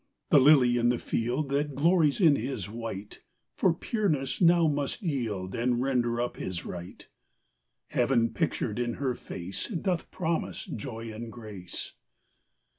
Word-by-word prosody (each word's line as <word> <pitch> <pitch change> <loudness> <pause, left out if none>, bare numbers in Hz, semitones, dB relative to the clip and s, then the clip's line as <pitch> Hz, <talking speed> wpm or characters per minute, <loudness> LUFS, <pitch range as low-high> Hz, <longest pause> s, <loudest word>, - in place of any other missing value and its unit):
The 145 - +8
lily 130 -3 +6
in 120 0 +3
the 120 - +2
field, 125 +7 -1
That 140 0 0
glories 160 +1 +3
in 160 -7 +6
his 115 -6 -3
white, 105 -2 -7 0.3
For 185 - +3
pureness 165 - -1
now 170 -1 +6
must 145 - -1
yield 110 - -2
And 120 +1 +1
render 120 -3 +1
up 120 0 -2
his 90 -2 -4
right; 90 0 -8 0.8
Heaven 120 -2 +2
pictured 110 0 -1
in 120 -1 -1
her 135 -3 -1
face 95 -4 -6
Doth 180 -4 -2
promise 165 0 -2
joy 115 -4 -6
and 115 +1 -7
grace. 105 -7 -7
125 Hz, 140 wpm, -28 LUFS, 115-150 Hz, 0.8 s, The